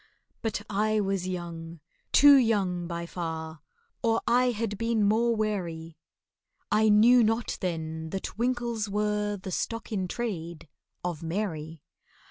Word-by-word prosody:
But 215 -2 -2
I 215 +1 +1
was 195 -2 -1
young—too 170 - +2
young, 195 -9 +2
by 170 0 -4
far— 160 -2 -5 0.4
Or 230 -1 +2
I 250 +2 +3
had 220 -3 -3
been 230 -2 +1
more 230 +2 +3
wary, 170 -7 -3 0.8
I 215 0 +4
knew 230 +4 +6
not 225 +2 0
then 160 -3 -3
that 190 +3 -5
winkles 235 -2 -1
are 210 0 0
The 190 0 -7
stock 230 +6 -3
in 190 -4 -1
trade 170 -7 -5 0.4
of 175 -3 -3
MARY. 165 -3 -4
205 Hz, 125 wpm, -28 LUFS, 170-225 Hz, 0.8 s, knew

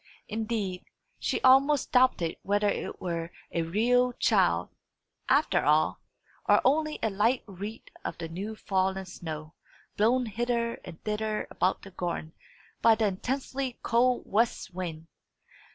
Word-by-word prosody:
Indeed, 215 -4 -2 0.4
she - - 0
almost 270 +2 +5
doubted 250 -10 +3
whether 205 +1 +1
it - - -3
were 170 -2 -3 0.2
a 170 - 0
real 245 +9 +2
child, - - +2 0.6
after 270 - +3
all, 155 +1 +3 0.5
or - - +7
only 305 +2 +2
a 220 - +1
light 225 +6 +2
wreath 205 +3 -8 0.2
of - - -4
the 165 - -5
new 195 +7 -5
fallen 190 -1 0
snow, 155 -3 -7 0.4
blown 245 +4 +3
hither 235 +1 -1
and 170 -3 -10
thither 215 0 -1
about 185 - 0
the 195 - -10
garden 170 -3 -4 0.5
by 230 -1 +6
the 220 0 +1
intensely 255 +5 -2
cold 245 +2 +2
west 220 -3 0
wind. 165 -3 -5
210 Hz, 135 wpm, -28 LUFS, 180-245 Hz, 0.6 s, or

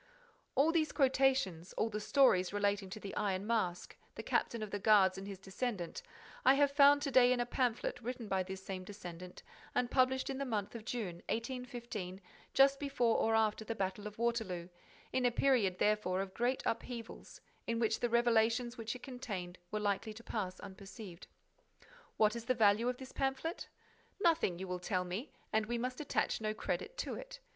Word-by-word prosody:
All 300 +4 +4
these 320 -2 +1
quotations, 260 - +2
all 225 - 0
the 210 - -2
stories 210 -6 +4
relating 205 -1 0
to 215 +3 -7
the 200 -2 -7
Iron 195 -1 -1
Mask, 210 -6 -1 0.2
the - - -6
captain 230 -2 0
of 210 - -6
the 205 - -2
guards 200 -3 +5
and 195 +1 -7
his 200 -1 -6
descendant, 195 - -4 0.4
I 265 - +7
have 285 0 +4
found 285 0 +6
to 280 - -1
day 250 -1 +6
in 250 - +2
a 240 - +1
pamphlet 245 0 -1
written 245 -1 -5
by 190 -1 +1
this 190 +1 -6
same 185 -1 -4
descendant 180 -2 -9 0.3
and 250 -1 +1
published 260 0 +3
in 265 - -4
the - - 0
month 215 -6 -2
of 230 -2 -8
June, 215 -9 -3
1815, 235 -6 -4 0.4
just 275 0 +6
before 260 -5 +1
or 225 - +2
just 225 - +5
after 215 0 0
the 225 +1 -4
battle 195 +1 -2
of 210 - -10
Waterloo, 220 -7 -1 0.4
in 260 - +1
a 245 - +5
period, 235 -7 +2
therefore, 205 -3 +1
of 190 -1 -5
great 245 +2 0
upheavals, 230 0 -5 0.3
in 230 0 0
which 225 -1 +1
the 240 - 0
revelations 235 +1 +2
which 225 +2 -3
it 250 - -10
contained 200 -9 -6
were 215 - -2
likely 205 +1 -1
to 230 - -11
pass 185 -6 -3
unperceived. 195 -1 -10 0.9
What 215 +1 +4
is 235 -1 -6
the 255 +1 +1
value 220 +1 +4
of 250 - -2
this 260 0 -9
pamphlet? 270 +6 -2 0.5
Nothing, 330 - +2
you 190 +1 -5
will 180 0 -3
tell 180 0 -1
me, 185 +10 -5 0.2
and 215 0 +2
we 240 +1 -1
must 250 +3 -3
attach 290 - 0
no 215 0 -1
credit - - -3
to - - -4
it. - - -8
225 Hz, 190 wpm, -35 LUFS, 195-250 Hz, 0.9 s, I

